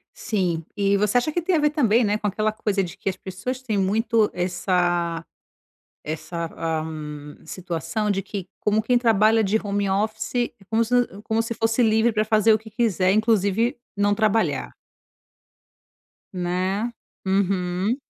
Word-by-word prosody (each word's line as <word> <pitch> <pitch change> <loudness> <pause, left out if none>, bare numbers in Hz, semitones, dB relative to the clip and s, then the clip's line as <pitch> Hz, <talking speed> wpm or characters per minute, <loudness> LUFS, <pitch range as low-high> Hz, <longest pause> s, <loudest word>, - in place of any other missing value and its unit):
Sim. 180 -6 -1
E 200 -1 +2
você 210 +3 +1
acha 275 +5 -1
que 345 - 0
tem 350 +1 +1
a - - +3
ver 300 0 +3
também, 240 -6 +3
né, 210 0 +1
com 210 - -3
aquela 215 +2 0
coisa 205 -2 0
de 180 +1 -8
que - - -3
as 190 - -2
pessoas 220 +8 -5
têm 220 -5 -1
muito 215 +3 +2
essa 175 -2 0 0.8
essa, 160 +2 -4
ah, 160 -1 -1 0.6
situação 185 +6 -3
de 195 -1 0
que 190 -1 -6
como 210 +1 +2
quem 245 +2 +3
trabalha 225 -2 +4
de 210 +1 +2
home 205 -2 -1
office 215 +2 -1
é 240 -1 +1 0.2
como 225 +1 +2
se 230 +2 -4
u 240 -5 0
como 220 +1 0
se 230 +1 -3
fosse 225 +2 +1
livre 225 +1 +3
pra 215 -1 0
fazer 215 0 +4
o 215 - +4
que 220 +1 -13
quiser, 205 -4 +1
inclusive 220 +3 +2 0.2
não 205 0 +2
trabalhar. 215 +1 +1 1.6
Né. 185 +5 -1 0.4
Uhum. 190 +2 +1
210 Hz, 165 wpm, -23 LUFS, 185-225 Hz, 1.6 s, trabalha